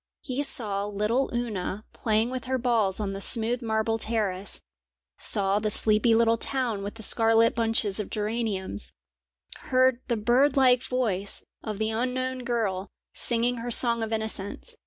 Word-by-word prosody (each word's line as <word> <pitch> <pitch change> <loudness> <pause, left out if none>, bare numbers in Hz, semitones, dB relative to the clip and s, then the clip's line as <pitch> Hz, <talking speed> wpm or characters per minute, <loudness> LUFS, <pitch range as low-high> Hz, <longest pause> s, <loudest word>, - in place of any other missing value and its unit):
He 260 +1 -2
saw 210 -8 -1
little 210 +6 0
Oona 215 -4 -3
playing 220 +2 0
with 255 0 -5
her 260 0 0
balls 230 -6 +1
on 200 -2 -2
the 195 - -5
smooth 235 +3 +3
marble 225 0 0
terrace, 205 -4 -2 0.6
saw 195 0 +2
the 215 0 -1
sleepy 215 +2 +3
little 230 0 +3
town 245 -7 0
with 205 +2 -6
the 225 - -6
scarlet 225 +1 +4
bunches 225 -3 0
of 210 - -4
geraniums, 210 - -3 0.8
heard 255 -1 +3
the 235 - 0
bird 255 +6 +3
like 250 -2 +5
voice 215 -7 -1 0.2
of 215 -2 -4
the 220 +1 -1
unknown 255 +3 -2
girl 220 -6 -2 0.3
singing 240 +1 +1
her 235 +1 -5
song 235 -1 +3
of 225 0 -3
innocence. 220 -3 -4
225 Hz, 155 wpm, -26 LUFS, 210-245 Hz, 0.8 s, like